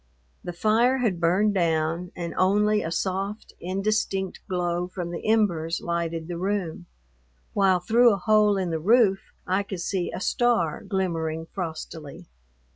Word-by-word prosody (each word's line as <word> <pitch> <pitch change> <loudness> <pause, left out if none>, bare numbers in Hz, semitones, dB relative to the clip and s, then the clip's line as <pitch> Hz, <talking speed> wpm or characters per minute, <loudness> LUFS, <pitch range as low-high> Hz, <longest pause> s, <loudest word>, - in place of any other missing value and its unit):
The 175 - -4
fire 225 +8 +2
had 220 -9 0
burned 185 +5 +2
down 165 -1 0
and 170 -1 -5
only 210 +3 +3
a 165 - -3
soft, 195 +4 -3
indistinct 195 +1 -1
glow 175 -1 -1
from 180 -2 -5
the 170 - -5
embers 170 -7 +1
lighted 170 -1 -3
the 175 -1 -5
room, 185 -3 -2 0.7
while 190 -2 +3
through 235 +6 +4
a 200 - +1
hole 210 +1 +3
in 185 -3 -1
the 160 - -1
roof 200 +1 +4 0.3
I 185 +2 +1
could 195 -3 -6
see 180 0 -2
a - - -5
star 230 - +1
glimmering 165 -5 -2
frostily. 160 -4 -7
185 Hz, 145 wpm, -25 LUFS, 170-205 Hz, 0.7 s, through